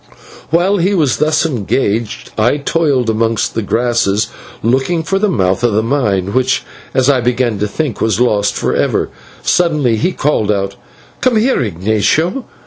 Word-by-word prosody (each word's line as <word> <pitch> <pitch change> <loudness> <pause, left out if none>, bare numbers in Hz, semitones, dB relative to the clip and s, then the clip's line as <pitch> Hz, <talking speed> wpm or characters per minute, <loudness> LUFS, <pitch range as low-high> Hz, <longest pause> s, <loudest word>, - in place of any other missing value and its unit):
While 180 +5 +2
he 190 +3 +1
was 150 -8 +2
thus 155 +2 +2
engaged, 120 -3 -2
and 110 - 0
I 135 - +2
toiled 145 -4 0
amongst 115 0 0
the 115 - -1
grasses 115 -2 0 0.3
looking 135 +8 +1
for 195 +3 0
the 210 0 +2
mouth 95 - 0
of 120 -3 +2
the 110 +2 +2
mine, 105 -7 0
which, 130 +1 +1 0.3
as 130 -1 +3
I 135 -3 +3
began 120 -3 0
to 105 - 0
think, 135 +2 -3
was 110 -1 +1
lost 105 -5 +1
forever, - - 0 0.3
suddenly 150 -10 +2
he 180 +12 0
called 135 - 0
out, 100 -1 -2 0.5
"Come 255 -2 +2
here, 240 - +2
Ignatio. 110 - 0
125 Hz, 160 wpm, -15 LUFS, 110-155 Hz, 0.5 s, as